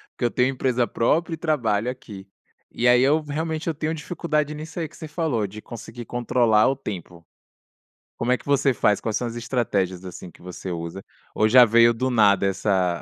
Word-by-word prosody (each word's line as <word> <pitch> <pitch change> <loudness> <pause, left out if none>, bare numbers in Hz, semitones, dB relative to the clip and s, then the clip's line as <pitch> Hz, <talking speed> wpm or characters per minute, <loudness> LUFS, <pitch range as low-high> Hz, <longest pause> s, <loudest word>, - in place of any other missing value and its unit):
porque - - -6
eu 120 - +2
tenho 125 0 +2
empresa 125 -2 0
própria 165 +9 0
e - - -3
trabalho 125 -8 0
aqui. 105 -6 -11 0.5
E 120 - 0
aí, 125 0 +6
eu 150 +4 +3
realmente 155 +2 -4
eu 165 - +1
tenho 155 +2 -2
dificuldade 155 -2 -2
nisso 155 +3 -7
aí 165 - -2
que - - -19
você 160 - -8
falou 145 -8 -1
de 105 +3 -10
conseguir 120 +1 -9
controlar 120 -2 +2
o 135 - 0
tempo. 90 -8 -8 0.9
Como 120 +2 -1
é - - +1
que - - -19
você 140 -1 +2
faz? 105 -2 +2
Quais 110 -2 -3
são 125 - -1
as 115 - -6
estratégias 105 -7 -1
assim 90 -1 -9
que - - -20
você 90 +1 -8
usa 85 +2 -5 0.3
ou 110 - +2
já 125 +2 +8
veio 115 +1 +5
do 130 +3 -1
nada 105 -5 +4
essa 95 -3 0
120 Hz, 205 wpm, -23 LUFS, 105-145 Hz, 0.9 s, já